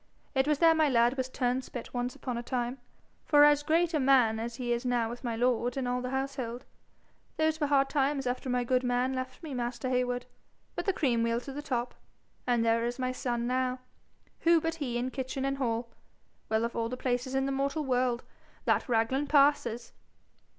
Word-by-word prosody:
It 265 0 +2
was 300 -1 +2
there 330 +1 +6
my 315 -2 +3
lad 240 0 +3
was 260 -1 -2
turnspit 250 -1 -3
once 245 0 -2
upon 250 - -4
a 235 - -3
time, 245 +1 -3 0.4
for 290 -1 +6
as 295 0 +6
great 330 +3 +2
a 305 - +2
man 255 -5 +4
as 230 +1 -4
he 240 -1 -1
is 235 - -2
now 240 -2 0
with 240 - -9
my 235 -2 -2
lord 245 +1 +1
and 260 -2 -1
all 250 0 -1
the 250 - -3
household. 265 -2 -3 0.7
Those 315 0 +1
were 295 - +2
hard 275 -1 +3
times 275 -1 +1
after 250 +1 -2
my 250 0 +1
good 250 +1 +2
man 250 +1 +1
left 255 +3 -5
me, 305 -4 -6
master 245 +1 -3
Heywood. 250 -1 0 0.5
But - - -3
the 395 - +3
cream 250 -9 +1
will 230 0 +1
to 275 - -8
the 290 - -5
top, 250 -4 -2 0.5
and 240 -2 +2
there 230 0 +2
is 240 +1 -2
my 255 -1 -1
son 240 -2 -2
now 255 +1 0 0.6
who 335 0 +5
but 325 +1 -2
he 245 -4 -1
in 250 +2 -2
kitchen 265 0 -3
and 275 0 -1
hall? 235 -2 -1 0.6
Well, 220 +1 +1
of 235 - -5
all 230 0 -1
places 250 +1 -2
in 270 0 +1
the 275 - -1
mortal 280 +3 -1
world, 250 -2 +1 0.4
that - - +1
Raglan 245 +5 +1
passes!' 275 -5 +2
255 Hz, 205 wpm, -30 LUFS, 240-275 Hz, 0.7 s, there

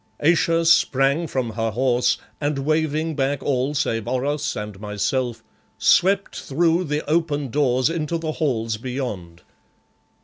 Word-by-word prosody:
Ayesha 165 +1 +2
sprang 140 0 +3
from 130 -5 -2
her 115 +1 -1
horse, 125 +2 +1 0.2
and 145 0 0
waving 155 +2 0
back 140 0 -1
all 135 +1 0
save 115 -5 -1
Oros 135 +4 -1
and 105 -2 -6
myself, 110 +3 -2 0.3
swept 195 +2 +3
through 170 +5 +1
the 150 0 -3
open 150 -3 0
doors 130 -2 +2
into 165 0 -2
the 160 -1 -3
halls 115 -9 -1
beyond. 110 -9 -5
140 Hz, 130 wpm, -22 LUFS, 120-155 Hz, 0.3 s, sprang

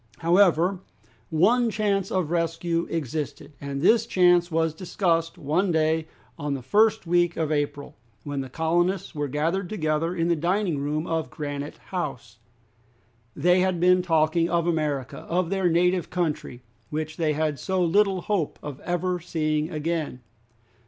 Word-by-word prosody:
However, 175 +1 +3 0.5
one 225 +9 +3
chance 200 -3 0
of 180 -4 -1
rescue 165 0 -1
existed, 150 -1 -4
and 140 0 -4
this 225 +4 +4
chance 175 -3 +4
was 160 -1 +1
discussed 170 -1 -1
one 175 +7 0
day 160 0 +1 0.3
on 145 -1 -2
the 130 - -7
first 220 - +3
week 175 0 +2
of 155 -2 -1
April, 145 -1 -2 0.3
when 145 -1 -3
the 130 - -7
colonists 175 +6 0
were 145 -2 -2
gathered 165 +7 -1
together 165 -2 -1
in 165 -1 0
the 170 - +3
dining 175 0 0
room 150 +3 -2
of 165 -2 -2
Granite 145 -1 -5 0.2
House. 135 - -4 1.0
They 180 +5 +3
had 185 -1 +1
been 180 +1 +4
talking 165 -1 +2
of 170 -1 +1
America, 150 -6 -1
of 175 +1 0
their 190 -2 +2
native 180 +1 +2
country, 160 -8 -3 0.3
which 155 +1 -4
they 155 -2 +1
had 150 -2 -1
so 190 +5 -1
little 190 +2 +2
hope 185 -6 -1
of 145 -2 -7
ever 180 +1 -1
seeing 155 -2 -1
again. 155 -4 -3
165 Hz, 150 wpm, -25 LUFS, 150-180 Hz, 1.0 s, this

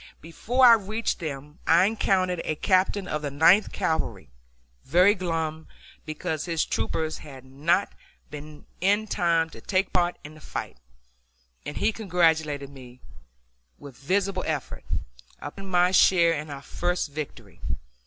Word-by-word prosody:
Before 240 +10 +1
I 240 - +10
reached 220 +1 -1
them 150 -1 -7
I 170 +3 +6
encountered 185 -4 +1
a 155 - -2
captain 185 +3 +1
of 150 - -2
the 145 - -3
Ninth 165 +9 +4
Cavalry, 160 - -2 0.5
very 180 +8 +5
glum 165 -4 -3 0.4
because 155 0 -3
his 165 -2 0
troopers 160 -1 -2
had 135 -4 -12
not 155 +9 0 0.4
been 150 0 -9
up - - -25 0.2
in 205 +3 +2
time 165 -5 +1
to - - -12
take 190 0 0
part 175 -1 +1
in 150 - -10
the 155 - -14
fight, - - -6 0.9
and 145 - -6
he 215 +2 +2
congratulated 160 -8 0
me 125 -2 -13 0.8
with 140 -3 -12
visible 185 +6 -1
effort! 155 -4 -4 0.5
upon 195 +7 -8
my 180 0 +3
share 170 -3 +5
in 150 0 -5
our 140 -1 -8
first 175 -2 -2
victory. 115 - -8
165 Hz, 145 wpm, -26 LUFS, 150-185 Hz, 0.9 s, I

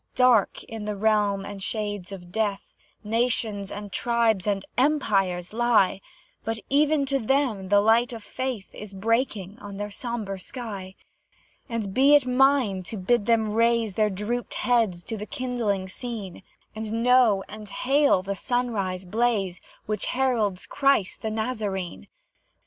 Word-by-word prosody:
Dark, 250 -5 +4
in 225 -2 -7
the 210 0 -2
realm 205 -1 +1
and 200 -1 -7
shades 205 -2 -4
of 175 -3 -9
Death, 205 -1 -2 0.3
Nations, 220 -3 0
and 205 0 -7
tribes, 230 -4 +1
and 195 -1 0
empires 200 - +1
lie, 225 -5 +3 0.4
But 225 0 -2
even 295 0 +3
to 275 0 0
them 230 -6 0
the 205 0 +5
light 230 +4 +4
of 230 -3 -8
Faith 250 -2 -4
Is 205 -2 -9
breaking 215 -1 -1
on 200 -4 -8
their 205 0 -4
sombre 215 -4 -4
sky: 195 -4 -7 0.7
And 220 -5 -3
be 275 +5 +6
it 285 -3 +4
mine 255 -6 +3
to 220 - -5
bid 210 +3 +1
them 220 -2 +2
raise 230 -2 +2
Their 215 +2 +2
drooped 210 +5 -3
heads 225 -8 +1
to 225 +3 -5
the 210 +1 -6
kindling 230 -7 -2
scene, 210 -3 -7 0.3
And 220 +1 -3
know 245 -6 +5
and 210 -1 -10
hail 270 -5 +2
the 200 +1 -3
sunrise 200 -5 -2
blaze 205 -2 0 0.2
Which 210 -1 -1
heralds 230 -8 0
Christ 275 -9 +1
the 220 - -2
Nazarene. 215 -5 -3
215 Hz, 145 wpm, -25 LUFS, 195-245 Hz, 0.7 s, be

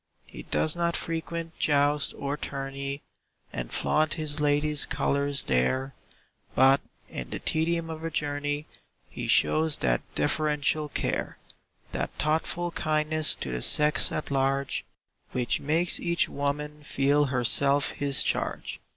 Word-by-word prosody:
He - - -10
does 155 - 0
not 170 0 0
frequent 165 0 -4
joust 145 0 +2
or 140 +1 -2
tourney, 140 0 -5 0.5
And 60 -1 -5
flaunt 155 0 +2
his 155 -2 -2
lady's 150 0 +2
colors 140 -1 0
there; 130 - +1 0.6
But 135 +1 +5 0.3
in - - -7
the - - -4
tedium 165 +1 0
of 160 0 -7
a 165 - -1
journey, 145 -1 -2 0.5
He - - -5
shows 155 -1 +3
that - - +1
deferential 150 - +1
care - - -2 0.5
That - - -2
thoughtful 165 +3 0
kindness 155 -1 +1
to 65 - -5
the 60 0 -3
sex 150 - +4
at 155 - -3
large, 135 0 0 0.5
Which 125 -2 +1
makes 165 +4 +1
each 170 0 +1
woman 150 +1 -3
feel 145 0 +2
herself 140 +2 +2
his 140 -1 +1
charge. - - -2
145 Hz, 130 wpm, -27 LUFS, 140-155 Hz, 0.6 s, But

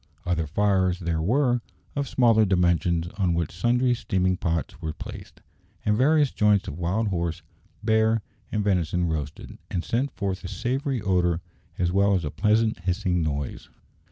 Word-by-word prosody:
Other 85 -3 0
fires 95 +1 +2
there 85 -3 -2
were, 125 - +2 0.3
of 140 -2 -2
smaller 115 -3 +4
dimensions, 85 -3 +2
on 90 -3 +2
which 85 -2 -1
sundry 125 +6 +2
steaming 95 -5 0
pots 85 -2 -2
were 80 -2 -3
placed, - - -10 0.4
and 105 - +3
various 145 +3 +3
joints 105 -2 +2
of 75 - -6
wild 100 +6 0
horse, 85 -3 -2 0.4
bear, 110 0 +2 0.3
and 105 -1 0
venison 90 -3 +1
roasted, 75 -3 -4
and 90 - -2
sent 130 +5 0
forth 100 -7 -4
a - - -4
savoury 130 - -2
odour 90 -3 +2 0.4
as 90 -1 +1
well 100 +1 +3
as 90 -4 -1
a 75 - -3
pleasant 110 +2 +2
hissing 90 0 0
noise. 70 -3 -3
95 Hz, 155 wpm, -25 LUFS, 85-110 Hz, 0.4 s, smaller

